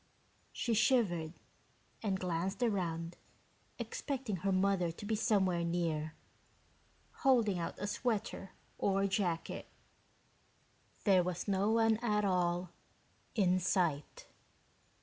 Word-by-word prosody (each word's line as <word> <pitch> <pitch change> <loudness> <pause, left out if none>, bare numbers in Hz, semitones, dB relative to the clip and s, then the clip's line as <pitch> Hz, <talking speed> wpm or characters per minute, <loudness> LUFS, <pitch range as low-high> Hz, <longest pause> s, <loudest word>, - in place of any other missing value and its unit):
She 235 - -1
shivered 205 -9 +2 0.7
and 195 -3 -1
glanced 180 +5 -1
around 170 -6 -1 0.6
expecting 260 -8 -3
her 195 +3 -1
mother 185 -2 +2
to 170 - -9
be 220 +1 0
somewhere 190 -6 +2
near, 165 -2 -1 1.0
holding 230 -9 +3
out 170 - -3
a 205 - -3
sweater 210 -3 -2 0.3
or 195 0 +2
jacket. 185 -4 -1 1.4
There 190 -3 +5
was 180 +1 -3
no 200 +1 +2
one 225 0 +4
at 210 -3 +1
all 180 -1 +1 0.6
in 185 -4 +3
sight. 170 -5 0
190 Hz, 105 wpm, -34 LUFS, 175-215 Hz, 1.4 s, There